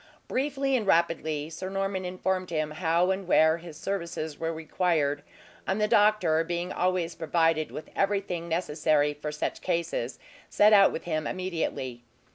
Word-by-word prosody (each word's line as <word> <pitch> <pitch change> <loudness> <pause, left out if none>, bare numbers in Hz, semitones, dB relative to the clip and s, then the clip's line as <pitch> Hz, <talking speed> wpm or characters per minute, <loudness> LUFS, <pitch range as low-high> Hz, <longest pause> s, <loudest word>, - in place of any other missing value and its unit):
Briefly 270 0 0
and 220 -5 -1
rapidly 160 -4 +1
Sir 185 +4 -5
Norman 195 -1 -2
informed 185 0 -2
him 155 -2 -1
how 170 +3 +1
and 190 -1 -3
where 160 -2 +5
his 165 -2 -11
services 170 -6 -4
were 165 0 -1
required; 160 -3 0 0.5
and 190 +2 0
the 210 - +2
doctor 210 -7 +3
being 175 +2 -3
always 180 -2 0
provided 165 -1 +1
with 155 - -8
everything 195 -4 -1
necessary 155 -3 +1
for 150 +1 -5
such 150 - -3
cases, 170 -8 -2 0.3
set 210 +1 +5
out 200 -1 +7
with - - -5
him 155 -3 -2
immediately. 160 -9 -3
170 Hz, 150 wpm, -27 LUFS, 155-190 Hz, 0.5 s, out